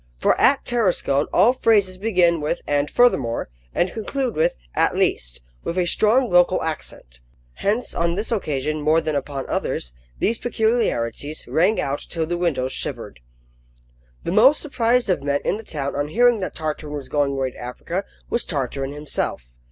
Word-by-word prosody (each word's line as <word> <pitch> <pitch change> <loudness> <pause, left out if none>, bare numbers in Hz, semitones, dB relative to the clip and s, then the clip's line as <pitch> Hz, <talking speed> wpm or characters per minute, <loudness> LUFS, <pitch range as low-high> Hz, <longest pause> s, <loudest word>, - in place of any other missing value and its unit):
For - - +3
at 275 - +4
Tarascon 185 - +1
all 210 +8 +5
phrases 205 -7 +2
begin 180 -6 +2
with 155 +4 -2
"and 145 0 0
furthermore," 135 - +2 0.2
and 175 +1 0
conclude 250 +2 -2
with 155 - +2 0.2
"at - - +2
least," - - 0 0.2
with 170 - -3
a 180 - +2
strong 225 +8 +3
local 180 -1 +3
accent. 65 - -6 0.4
Hence, 215 +5 -1
on 170 0 0
this 210 +5 -3
occasion 155 - -1
more 155 +2 +3
than 160 -1 -2
upon 140 -1 -3
others, - - -2 0.2
these 225 +2 0
peculiarities 220 - -1
rang 185 +7 +2
out 140 0 -1
till 165 -2 -3
the 175 +2 -2
windows 135 -7 0
shivered. - - -4 1.0
The - - -2
most 255 +10 +6
surprised 245 -4 +1
of 185 -6 +1
men 140 0 0
in 200 - +1
the 225 - -9
town 140 -8 -4
on 145 +1 -1
hearing 240 +6 +3
that 185 - -4
Tartarin 155 -1 -4
was 140 -2 -6
going 145 -2 +1
away 135 -1 -1
to - - -17
Africa, 165 +10 -4 0.2
was 235 - 0
Tartarin 135 -2 -3
himself. 145 - -3
170 Hz, 165 wpm, -22 LUFS, 145-220 Hz, 1.0 s, most